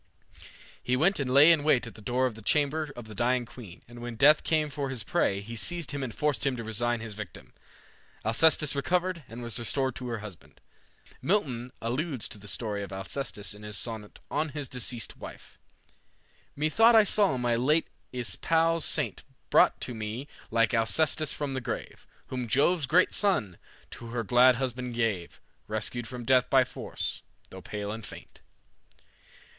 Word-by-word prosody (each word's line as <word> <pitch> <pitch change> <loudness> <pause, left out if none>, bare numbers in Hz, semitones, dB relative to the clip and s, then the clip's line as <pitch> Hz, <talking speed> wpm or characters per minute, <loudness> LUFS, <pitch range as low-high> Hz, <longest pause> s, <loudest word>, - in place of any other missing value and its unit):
He 125 - 0
went 175 +8 +3
and 130 -2 -1
lay 145 +5 +8
in 160 -3 +3
wait 135 -5 +3
at 115 - -9
the 110 - -14
door 125 +4 +1
of 125 - -1
the 110 - -12
chamber 150 +5 +1
of 120 - -8
the 110 - -10
dying 120 +4 +1
queen, 110 -7 -12
and 120 0 -11
when 120 -1 -5
Death 145 +6 +6
came 155 -2 +1
for 140 0 -3
his 125 -5 -3
prey, 100 0 +1
he 115 +3 -8
seized 170 +6 -2
him 140 - -3
and 130 -3 -3
forced 150 +2 0
him 135 -2 +1
to 115 - -5
resign 115 +1 0
his 110 -2 -6
victim. 100 -6 -9 0.7
Alcestis 150 +6 +4
recovered, 175 +3 0
and 120 +2 -8
was 115 +1 -2
restored 130 +3 -1
to 125 - -6
her 115 -1 -2
husband. 105 -5 -11 0.6
Milton 130 - 0
alludes 130 +2 -2
to 105 - -11
the 105 - -12
story 105 -1 -2
of 100 -2 -6
Alcestis 100 0 -3
in 105 - -13
his 105 -1 -4
Sonnet 110 -2 -5
"on 155 +2 0
his 145 -1 -5
deceased 120 -2 -4
wife:" - - -11 1.0
"Methought 220 +11 +4
I 220 - +8
saw 200 -9 +3
my 120 -1 +1
late 150 +7 +2 0.2
espoused 160 - +1
saint - - 0 0.3
Brought - - +5
to 125 - -4
me 110 +5 -5 0.2
like 115 +1 +2
Alcestis 150 +7 +2
from 145 -2 -3
the 130 - -2
grave, 120 -1 -6 0.2
Whom 125 -2 -3
Jove's 145 +5 +2
great 180 +4 +4
son 125 - +1 0.3
to 120 - -8
her 115 0 -3
glad 125 +3 +6
husband 125 -1 -3
gave, 110 -7 -1 0.3
Rescued 110 +2 -3
from 125 0 -7
death 130 0 +4
by - - +6
force, - - -5 0.3
though - - -9
pale 105 0 -5
and 110 +1 -6
faint." - - -12
125 Hz, 180 wpm, -28 LUFS, 115-145 Hz, 1.0 s, lay